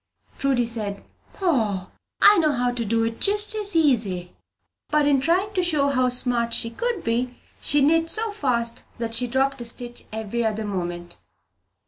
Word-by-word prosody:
Prudy 265 -3 +1
said, 215 -4 -4 0.3
"Poh, 220 - 0 0.3
I 415 -2 +7
know 310 -3 +2
how 245 -1 0
to 245 -1 -2
do 225 +1 0
it 225 0 -3
just 415 +1 +3
as 415 -3 0
easy!" 215 - +1 0.5
But 300 -1 +2
in 280 -2 +3
trying 370 +8 +1
to 370 - +1
show 305 -5 +1
them 280 - -2
how 255 0 +3
smart 240 -2 +1
she 230 - +1
could 470 - -3
be, 245 +2 -1 0.3
she 290 0 +3
knit 325 +3 +3
so 445 +3 0
fast 235 - -1 0.2
that 230 -1 -3
she 245 +2 +2
dropped 270 +1 0
a - - -6
stitch 240 +1 -2
every 220 +2 -3
other 220 -1 -2
moment. 175 -3 -5
245 Hz, 175 wpm, -23 LUFS, 230-310 Hz, 0.5 s, I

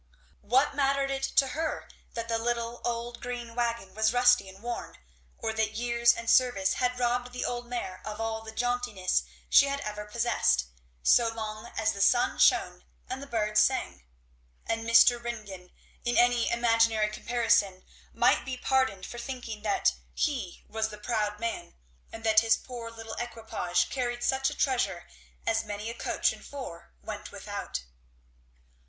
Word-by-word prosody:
What 260 +8 +2
mattered 275 -1 +1
it 270 0 -2
to 270 0 +2
her 315 +4 -3 0.3
that 230 -1 -3
the 230 -1 0
little 235 0 -2
old 235 0 -3
green 240 -1 -5
wagon 235 -5 -2
was 220 +1 +2
rusty 245 -4 +4
and 190 +3 -15
worn, 240 0 -5 0.4
or 220 - -2
that 220 -1 0
years 235 0 +3
and 230 0 -6
service 230 -6 +4
had 250 0 0
robbed 245 0 0
the 250 - -3
old 240 0 -3
mare 215 -7 -5
of 215 0 -6
all 225 0 -2
the 220 0 -9
jauntiness 245 -5 0 0.3
she 280 - +6
had 280 0 -1
ever 210 -2 -5
possessed, 210 - +1 0.4
so 235 - +5
long 215 -1 -6
as 220 0 +2
the 200 - -5
sun - - +3
shone - - +3 0.3
and 265 - -4
the 280 - -8
birds 215 -4 +2
sang? 260 - 0 0.6
And 225 0 -2
Mr. 235 +1 +6
Ringgan, 205 -6 -6 0.3
in 240 - 0
any 245 -1 +4
imaginary 230 -2 +3
comparison, 215 -5 +1 0.3
might - - +3
be 260 -1 -4
pardoned 260 -8 +1
for 240 - -8
thinking 235 -4 -6
that 210 -1 +2 0.2
he 250 - -2
was 220 0 -2
the 210 - -9
proud 210 -1 -2
man, 230 - -4 0.4
and 225 - -9
that 220 -1 +6
his 225 0 +3
poor 240 -2 -8
little 225 -1 -8
equipage 225 -7 -1
carried 240 -2 -2
such 265 +1 +2
a - - -8
treasure 250 -9 0 0.4
as 225 0 +1
many 210 +1 -5
a - - -7
coach - - 0
and - - -13
four 255 - -8
went - - -7
without. - - -5
230 Hz, 165 wpm, -29 LUFS, 215-245 Hz, 0.6 s, she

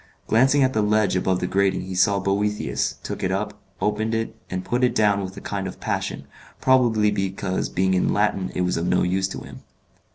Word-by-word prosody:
Glancing 135 +5 +4
at 130 0 +2
the 110 - +2
ledge 105 -2 +2
above 95 0 +1
the - - 0
grating 95 +1 +1
he 95 0 -6
saw 100 +2 +3
Boethius, 100 +2 -1
took - - -5
it - - 0
up, - - -3 0.2
opened 110 +2 0
it, 115 0 -2
and 90 0 -4
put 125 +1 0
it 125 -1 +2
down 105 -3 +3
with 95 0 -6
a - - -7
kind 100 -2 -3
of 95 - -8
passion, - - -3 0.3
probably 120 -5 +3
because 95 -1 -2
being 95 +1 +1
in 90 - +2
Latin 100 -2 +1
it - - 0
was 90 -1 0
of 85 +2 -1
no - - +2
use 95 +2 +1
to 65 -9 -7
him. 65 +2 -11
100 Hz, 215 wpm, -23 LUFS, 95-110 Hz, 0.3 s, Glancing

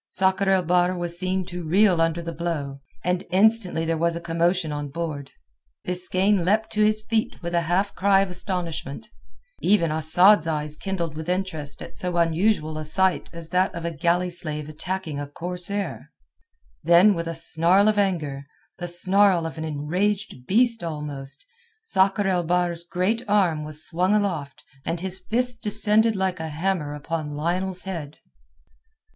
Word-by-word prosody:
Sakr 190 +1 +1
el 190 -1 +3
Bahr 180 +1 +2
was 175 0 -1
seen 185 0 0
to 180 -1 -6
reel 180 +1 +3
under 165 +1 0
the 170 - -4
blow, 155 -5 -4 0.2
and 180 +1 0
instantly 195 -4 +2
there 165 0 -1
was 170 0 +1
a - - -3
commotion 170 0 0
on 145 -1 -4
board. 145 -2 -5 0.6
Biskaine 185 +2 +1
leapt 215 +5 +1
to 215 -1 +2
his 215 0 +2
feet 220 0 -1
with 170 0 -4
a 170 - +2
half 195 +3 +1
cry 195 0 +3
of 195 -2 -2
astonishment; 180 0 -4 0.5
even 180 -5 +3
Asad's 165 +4 +4
eyes 150 -1 -1
kindled 170 -4 -3
with 160 +2 -6
interest 180 -6 -2
at - - -11
so 180 -1 0
unusual 165 -1 +1
a - - -4
sight 190 +4 +1
as 165 -1 -7
that 185 +1 +1
of 170 0 -5
a 170 - -1
galley 175 +3 +1
slave 150 -3 -4
attacking 160 0 -4
a 145 - -5
corsair. 180 +6 -4 0.7
Then 175 +6 +6
with 170 -2 -4
a 165 - -3
snarl 170 +5 +3
of 215 -1 +3
anger, 150 -8 -1 0.3
the 175 - -4
snarl 185 0 +4
of 160 0 -6
an - - -4
enraged 160 0 -2
beast 230 +1 +2
almost, 150 - -5 0.4
Sakr 200 - +2
el 180 -2 +1
Bahr's 175 0 0
great 195 +6 0
arm 185 -7 +2
was 155 +1 -2
swung 180 +4 +1
aloft 170 -10 -2 0.2
and 170 - -2
his 190 +1 -3
fist 240 +5 -1
descended 215 +1 +3
like 190 -1 -1
a 160 - -4
hammer 155 -2 -2
upon 155 +1 -4
Lionel's 180 +5 -2
head. 165 -6 -6
175 Hz, 165 wpm, -24 LUFS, 160-190 Hz, 0.7 s, Then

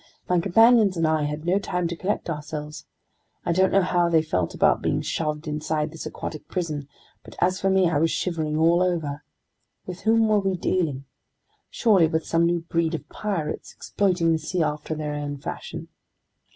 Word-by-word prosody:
My 180 -1 +2
companions 215 +1 +5
and 165 - +1
I 155 -1 +1
had 150 +2 -4
no 185 +3 +2
time 180 -3 -2
to 170 - -3
collect 190 +5 -2
ourselves. 150 -1 -6 0.6
I - - +1
don't 190 +2 +3
know 195 -1 +4
how 175 -1 +2
they 160 -2 +3
felt 90 - -1
about - - +3
being - - 0
shoved 155 0 -3
inside 150 0 -2
this 165 - -7
aquatic 155 - -7
prison, 155 -6 -3 0.4
but - - -13
as 185 +1 +1
for 195 - +2
me, 190 -1 +4
I 155 -4 +1
was 165 +2 +3
shivering 160 -4 -1
all 165 +2 +4
over. 160 -5 -1 0.6
With 180 0 -7
whom 225 0 +3
were 215 -1 +3
we 195 -2 -1
dealing? 155 -7 -1 0.6
Surely 200 -8 +4
with 160 0 -1
some 165 0 +2
new 170 0 0
breed 165 0 -1
of - - -8
pirates, 195 -8 -4
exploiting 180 -4 +1
the 160 - +1
sea 170 +2 -1
after 150 +1 -3
their 150 -1 -3
own 145 -1 -4
fashion. 135 - -7
165 Hz, 185 wpm, -24 LUFS, 155-185 Hz, 0.6 s, companions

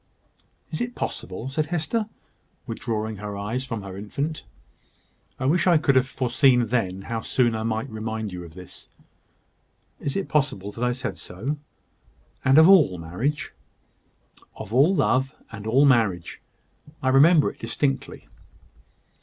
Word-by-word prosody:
"Is - - -3
it 240 0 -3
possible?" 95 +6 -5
said 150 +3 -1
Hester, 175 +7 -1 0.6
withdrawing 110 -1 -3
her 105 0 -6
eyes 115 +6 -3
from 115 -5 -4
her 95 -1 -8
infant. 140 +10 -4 1.0
"I 130 - -2
wish 170 +6 +2
I 175 -2 +6
could 145 -3 +2
have 130 0 +4
foreseen 130 -1 +3
then 95 -6 -1
how 115 +2 -3
soon 120 0 +1
I 110 - -2
might 110 +3 -2
remind 110 -3 -4
you 90 -1 -6
of 85 -1 -12
this." 90 0 -12 1.1
"Is 140 - -2
it 195 - -2
possible 135 -10 0
that 115 - -5
I 125 - +2
said 125 0 -4
so? 125 +12 -4 0.9
and 135 +2 +5
of 160 +1 +9
all 160 - +6
marriage?" 110 - -3 1.0
"Of 105 - -8
all 145 +10 +5
love, 135 -2 +1 0.2
and 105 -2 -7
all 130 +6 +5
marriage. 110 -10 +2 0.6
I 130 - +2
remember 150 +4 +5
it - - -22
distinctly." 135 -2 -2
125 Hz, 145 wpm, -24 LUFS, 105-145 Hz, 1.1 s, of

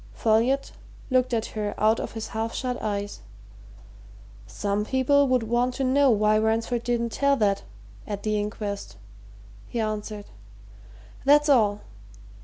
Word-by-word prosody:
Folliot 230 - +2 0.4
looked 255 0 +2
at 225 -2 0
her 210 -1 -3
out 220 +1 +3
of - - -5
his 225 -1 -5
half 225 +1 -3
shut 250 -1 -3
eyes. 205 -1 -3 1.3
"Some 200 - -2
people 265 +4 +3
would 255 -2 +2
want 240 +2 0
to 270 - -2
know 270 +2 +4
why 215 -1 +3
Ransford 225 +2 0
didn't 235 -1 -1
tell 280 +3 +2
that 205 -5 +1 0.5
at 200 -1 -5
the 215 -1 0
inquest," 205 - -5 0.7
he 235 - -4
answered. 215 -1 -3 1.0
"That's 295 +2 +5
all. 210 -6 +3
225 Hz, 135 wpm, -25 LUFS, 210-255 Hz, 1.3 s, That's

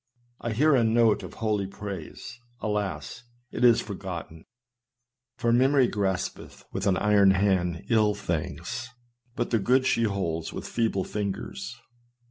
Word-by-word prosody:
I 115 - -3
hear 150 +7 +4
a 125 -4 +4
note 115 -1 +3
of 90 -3 -9
holy 105 -3 -1
praise: 100 +5 -8 0.2
alas! 105 +2 -3 0.3
it - - -3
is 120 -2 +6
forgotten! 90 -5 -7 0.9
For 115 0 +1
memory 130 +1 +4
graspeth 95 -4 -3
with - - -2
an 95 -2 +3
iron 105 -2 +5
hand 95 -3 +1
ill 110 -3 +3
things, 85 - -4 0.5
but 120 - -2
the 115 - +3
good 130 +6 +3
she 115 -3 +2
holdeth 85 -6 -2
with - - -6
feeble 110 -5 0
fingers. 100 -1 -4
105 Hz, 135 wpm, -27 LUFS, 95-115 Hz, 0.9 s, is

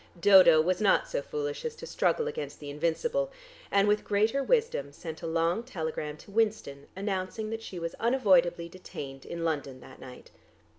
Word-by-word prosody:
Dodo 185 -4 +7
was 180 +4 0
not 205 - +3
so - - -2
foolish 455 -1 -4
as 470 -1 -4
to 485 - -9
struggle 470 -1 0
against 470 0 -5
the 145 -1 -7
invincible, 460 - -1 0.4
and 200 0 +3
with 210 0 +2
greater 215 +6 +1
wisdom 445 - +1
sent 160 +2 -8
a 165 - -4
long 165 +5 +1
telegram 160 - -5
to 200 - -15
Winston 205 -10 -1
announcing 195 +2 -3
that 225 0 -4
she 190 - -8
was 170 -1 -4
unavoidably 185 -8 +3
detained 140 -6 -9
in 170 -1 -5
London 145 -5 -2
that - - -14
night. 125 -1 -12
190 Hz, 175 wpm, -29 LUFS, 160-235 Hz, 0.4 s, Dodo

